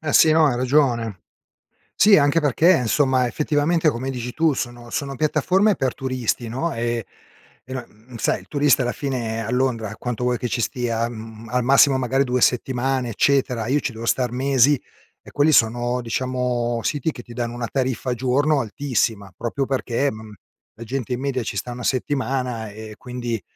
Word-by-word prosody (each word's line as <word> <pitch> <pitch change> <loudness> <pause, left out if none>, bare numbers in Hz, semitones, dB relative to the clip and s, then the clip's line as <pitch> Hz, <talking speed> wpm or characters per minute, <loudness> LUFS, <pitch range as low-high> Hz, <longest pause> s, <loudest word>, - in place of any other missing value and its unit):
Eh, 155 -3 -3
sì, 160 - +6
no, 160 -1 +5
hai 125 -4 +1
ragione. 120 - +1 0.7
Sì, 205 -3 +6
anche 145 +3 +3
perché, 155 +4 +4
insomma, 130 +1 +2
effettivamente, 155 +5 +1
come 130 +1 -4
dici 125 -1 -5
tu, 160 -2 +2
sono 120 -2 -5
sono 140 -1 -3
piattaforme 185 - +2
per 135 -5 -1
turisti, 130 -3 -2
no, 135 +9 -2
ehm, 115 -1 -2 0.6
no 130 -2 -6 0.3
sai, - - 0
il - - -19
turista 145 -2 +3
alla 125 0 0
fine 115 -5 -3
a 110 - -4
Londra, 120 -4 -1
quanto 125 +1 -4
vuoi 125 -1 +1
che 125 - -2
ci 115 - -2
stia? 115 -1 -1
Mhmm, 110 -1 -9
al 125 0 0
massimo 135 +1 +5
magari 130 +2 +1
2 125 -1 -1
settimane, 130 0 +1
eccetera, 125 -2 +1
io 145 +3 +2
ci 130 - -3
devo 115 +1 -7
star 125 0 +1
mesi 135 +1 +3 0.4
e - - -12
quelli 145 +2 +3
sono, 120 0 +2
diciamo, 120 0 -1
siti 150 +4 -1
che 120 - -9
ti 120 - -13
danno 120 0 -3
una 120 -1 -4
tariffa 130 -1 -1
al 125 - 0
giorno 135 +4 +2
altissima, 110 -5 -1
proprio 125 +4 -2
perché, 135 0 -1
mhmm, 110 -1 -10 0.4
la 115 - -9
gente 125 +1 -3
in 125 - -3
media 130 -2 -2
ci - - -5
sta 125 - -3
una 120 0 -7
settimana 130 -3 -1
e 110 0 -9
quindi 120 -4 -4
125 Hz, 180 wpm, -22 LUFS, 120-140 Hz, 0.7 s, sì